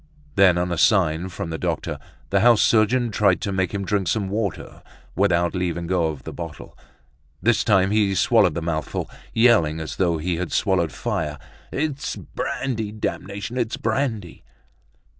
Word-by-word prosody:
Then, 95 -3 +5
on 90 0 -1
a 85 - -1
sign 90 -3 +3
from 85 -2 -5
the 80 - -4
doctor, - - -2 0.3
the 100 - +3
house 115 +1 +5
surgeon 115 +2 +3
tried 100 -3 +3
to 100 - -2
make 95 -2 0
him 100 -1 -3
drink 100 -2 0
some 100 -1 0
water 105 0 -4 0.3
without 85 -3 +2
leaving 85 -2 -2
go 85 -1 +1
of 75 -4 -6
the - - -7
bottle. 80 -4 -8 0.6
This 115 +5 +2
time 95 -2 +3
he 105 -2 +2
swallowed - - +3
the 85 - -3
mouthful, 80 -3 -2 0.2
yelling 110 -10 +4
as 80 - -6
though 85 -3 +1
he 85 +2 -2
had 90 0 -3
swallowed 95 -5 +1
fire. 75 -2 -3 0.3
"It's 145 -1 -2
brandy; 110 -6 -3
damnation! 105 +2 -4
It's 115 -2 -1
brandy!" 110 -6 -2
95 Hz, 160 wpm, -23 LUFS, 85-110 Hz, 0.6 s, Then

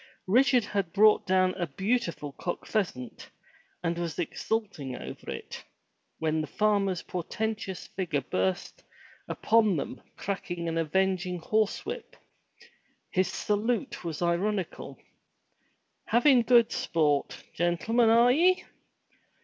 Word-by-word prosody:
Richard 245 +3 +4
had 200 -5 -2
brought 210 0 +5
down 185 0 +3
a 175 - -1
beautiful 190 - -1
cock 175 +5 -5
pheasant, 170 - -3 0.5
and 170 0 -1
was 170 -3 -3
exulting 175 - -3
over - - -8
it, - - -7 0.5
when 160 0 0
the 155 - -4
farmer's 200 0 +1
portentous 195 +2 -4
figure 170 -7 -2
burst 95 -6 -2 0.4
upon 215 -5 +2
them - - -5 0.2
cracking 175 -3 -4
an 165 - -2
avenging 185 +2 0
horse 215 +5 0
whip. 465 +2 -6 1.0
His 185 0 +2
salute 225 +5 -1
was 165 0 -4
ironical. 185 +2 -1 1.1
"Havin' 245 +2 +5
good 235 -1 +5
sport, 150 -4 0
gentlemen, 215 +8 +2
are 235 +2 +6
ye?" 360 +7 +3
190 Hz, 110 wpm, -28 LUFS, 170-220 Hz, 1.1 s, are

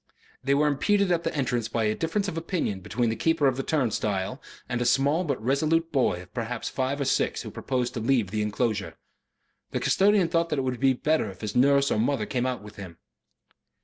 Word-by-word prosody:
They 140 +1 +2
were 150 +2 +3
impeded 200 +7 +2
at 170 -1 +1
the - - -2
entrance 125 -5 0
by 115 0 -1
a 105 0 +2
difference 165 - -1
of 180 - -4
opinion 165 - -2
between 110 +4 -1
the - - -2
keeper 160 +1 +1
of 135 -2 +3
the 135 - -2
turnstile 115 -5 -1 0.3
and 120 -1 -2
a - - +3
small 135 +7 +2
but 140 -7 -2
resolute 155 +7 +1
boy 95 -10 +1
of 90 - -21
perhaps 115 0 -3
five 135 +2 -2
or 140 - 0
six - - 0
who - - -7
proposed 125 -2 -2
to - - -3
leave 115 -4 +1
the 105 0 -1
enclosure. 105 -1 -1 0.7
The - - -2
custodian 200 -2 +3
thought 165 0 0
that 150 - -1
it 135 - 0
would 130 -2 -2
be 135 -1 +4
better 150 -2 0
if 95 - -12
his 105 -2 -4
nurse 140 +2 +4
or - - +1
his - - +3
mother 125 -4 0
came 125 +2 -1
out 125 -5 -3
with 105 0 -12
him. 90 -5 -9
130 Hz, 225 wpm, -26 LUFS, 110-150 Hz, 0.7 s, be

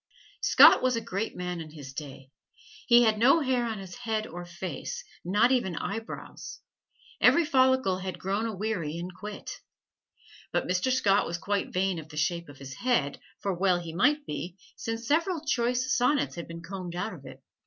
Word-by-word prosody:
Scott - - +8
was 255 -1 +2
a - - 0
great 220 -1 -3
man 180 -1 -4
in 155 - -8
his 145 -4 -10
day. 135 -2 -9 0.6
He 240 -1 +7
had 220 -2 +2
no 275 +8 +5
hair 255 -3 +1
on 220 -1 -3
his 190 -2 -9
head 220 -3 -2
or 175 -1 -8
face, 185 - -6 0.2
not 210 +7 +3
even 215 -9 +1
eyebrows. 220 +7 -6 0.6
Every 340 - +6
follicle 260 - +3
had 185 -1 -5
grown 200 +4 -1
aweary 195 -7 -3
and 180 +2 -6
quit. 210 +3 -8 0.9
But - - 0
Mr. 180 +8 +1
Scott 205 -6 +3
was 170 - -3
quite 200 +3 -2
vain 185 -1 0
of 155 0 -11
the 150 - -10
shape 170 +1 -1
of 145 - -12
his 135 -1 -9
head, 235 - 0 0.2
for 195 - -1
well 180 0 +2
he 170 -2 -7
might 290 - +2
be, 175 -6 -5 0.2
since 225 0 -4
several 325 +2 +1
choice 250 -1 +1
sonnets 250 +4 +2
had 170 - -7
been 165 0 -8
combed 180 -1 -6
out 200 +5 -3
of - - -11
it. - - -12
195 Hz, 185 wpm, -28 LUFS, 175-245 Hz, 0.9 s, Scott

